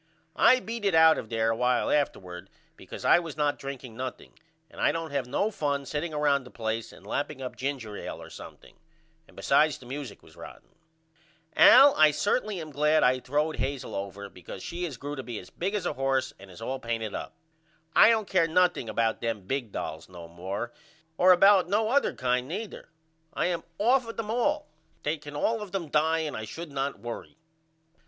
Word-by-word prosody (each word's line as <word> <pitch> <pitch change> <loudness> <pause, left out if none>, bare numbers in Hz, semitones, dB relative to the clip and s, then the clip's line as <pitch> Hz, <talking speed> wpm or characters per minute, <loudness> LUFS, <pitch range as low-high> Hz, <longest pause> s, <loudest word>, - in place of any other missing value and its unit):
I 255 - +6
beat 230 -2 -6
it 195 -4 +2
out 160 0 +6
of 110 - -8
there 115 0 +1
a - - 0
while 125 +1 +1
afterward 95 -10 -2 0.3
because - - -10
I - - +6
was 165 -3 -7
not 145 -1 0
drinking 135 -4 -7
nothing 130 +1 -7 0.3
and - - -10
I - - +4
don't 165 -2 -4
have 140 -3 -2
no 200 +12 0
fun 140 -6 -2
setting 150 +5 -3
round 145 -3 +1
a - - -11
place 115 -1 -4
and - - -16
lapping 145 0 -3
up 130 -1 -6
ginger 130 -6 -4
ail - - -6
or - - -11
something. - - -12 0.5
And - - -21
besides 150 +2 +3
the 125 - -15
music 130 -3 -7
was - - -18
rotten. - - -12 0.9
Al 275 +2 +8
I 155 - +6
am 150 - 0
certainly 205 - 0
glad 150 +2 +3
I 130 +1 +3
throwed 150 +5 -1
Hazel 135 -1 -3
over 100 +1 -5
because 90 0 -10
she 175 +1 -4
has 145 -8 -6
grew 145 +3 -5
to 135 - -5
be 120 -3 -6
as 90 - -10
big 195 +4 -3
as 205 - -2
a - - -1
horse 135 0 0
and 100 0 -13
is 95 +5 -11
all 130 +3 -3
painted 115 -3 -3
up. - - -6 0.6
I - - +8
don't 220 -3 +2
care 185 -4 +2
nothing 175 -7 +2
about 110 +1 0
them 115 -3 -2
big 120 +3 -3
dolls 80 -2 -6
no 85 -2 -10
more 95 +7 -5 0.4
or 185 +2 +6
about 190 0 +6
no 215 +2 +1
other 280 +4 +2
kind 125 0 0
neither. 200 +7 -6 0.5
I - - 0
am 175 -1 -1 0.2
off 245 +3 +3
of 230 - -8
them 220 -1 -3
all. 295 +6 0 0.4
They 155 +2 -1
can 145 0 -10
all 225 +9 0
of 205 -3 -7
them 180 -5 -3
die 160 +2 +2
and 150 - -4
I 110 - -5
should 165 +8 -8
not 140 0 -3
worry. 120 +5 -8
145 Hz, 205 wpm, -27 LUFS, 120-175 Hz, 0.9 s, Al